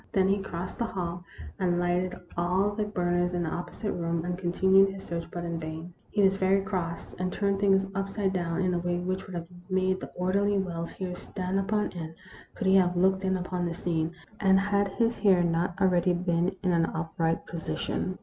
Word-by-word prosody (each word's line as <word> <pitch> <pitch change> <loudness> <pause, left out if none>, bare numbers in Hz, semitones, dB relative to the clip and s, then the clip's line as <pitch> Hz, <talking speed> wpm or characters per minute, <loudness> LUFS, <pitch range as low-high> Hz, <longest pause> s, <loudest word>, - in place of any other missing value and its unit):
Then 190 -1 +3
he 200 +1 +3
crossed 180 -1 -5
the 235 - +1
hall, 175 -4 -4 0.4
and 175 -2 +2
lighted 175 +1 0 0.2
all 180 +4 +2
the 210 0 -1
burners 175 -3 0
in 175 - 0
the 160 - -2
opposite 175 +4 -4
room, 170 -1 -1
and 180 0 -1
continued 190 +2 +4
his 195 0 -7
search, 170 -1 -4
but 175 - -5
in 170 -1 -3
vain. 160 +2 -6 0.2
He 205 - +2
was 195 0 +4
very 195 +1 +3
cross, 180 -4 -3
and 185 0 -1
turned 200 0 0
things 195 -1 +4
upside 195 0 -1
down, 170 -2 -1
in 180 0 +1
a 175 - +1
way 175 0 -1
which 185 +2 -3
would 185 - -7
have 170 -1 -3 0.2
made 185 0 +1
the - - -7
orderly 200 +3 +2
Wells's 170 -3 -3
hair 185 -2 -4
stand 185 +1 -3
upon 210 +2 0
end 165 -2 -6 0.4
could 215 - -3
he 190 +1 +6
have 180 -1 +3
looked 190 +1 +3
in 190 0 +1
upon 180 -1 -2
the 170 - -3
scene, 165 -1 -1 0.3
and 190 -1 +5
had 200 0 +2
his 230 0 +1
hair 190 -4 +5
not 170 +2 0
already 180 -2 +3
been 175 +1 +1
in 185 - +2
an 165 -1 +3
upright 165 0 -1
position. 175 +2 -3
180 Hz, 205 wpm, -28 LUFS, 175-195 Hz, 0.4 s, he